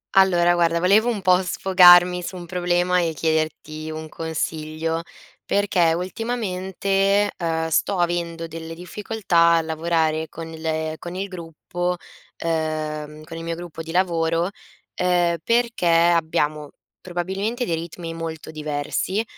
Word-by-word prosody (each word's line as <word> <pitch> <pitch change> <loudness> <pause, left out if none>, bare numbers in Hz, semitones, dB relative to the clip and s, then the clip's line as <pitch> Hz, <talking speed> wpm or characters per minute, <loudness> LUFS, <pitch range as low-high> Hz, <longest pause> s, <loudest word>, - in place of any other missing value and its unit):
Allora 175 -2 +5
guarda 170 -1 +2
volevo 200 +7 +4
un 220 -4 -2
po' 185 0 +4
sfogarmi 180 -1 +6
su 185 - -6
un 175 - -8
problema 180 +1 +1
e 165 -2 -1
chiederti 155 0 -2
un 155 0 -6
consiglio, 160 0 -3 0.4
perché 185 -5 +2
ultimamente, 195 0 0
ehm, 165 -2 -1
sto 180 +4 +1
avendo 170 -1 -1
delle 165 0 -7
difficoltà 175 -1 +1
a - - +2
lavorare 160 0 0
con 165 0 -8
le 160 -1 -3
con 175 +1 -8
il 190 +2 -3
gruppo 175 0 -4 0.4
ehm, 155 -2 -3
con 165 - -8
il 165 - -6
mio 165 0 -3
gruppo 170 -1 -8
di 165 - -7
lavoro, 170 -1 +1 0.5
ehm, 175 -1 +2
perché 235 -5 +1
abbiamo 160 -3 +2 0.3
probabilmente 190 +7 -3
dei 170 - 0
ritmi 165 0 -6
molto 165 -1 -6
diversi, 155 +6 -2
170 Hz, 130 wpm, -22 LUFS, 160-180 Hz, 0.5 s, sfogarmi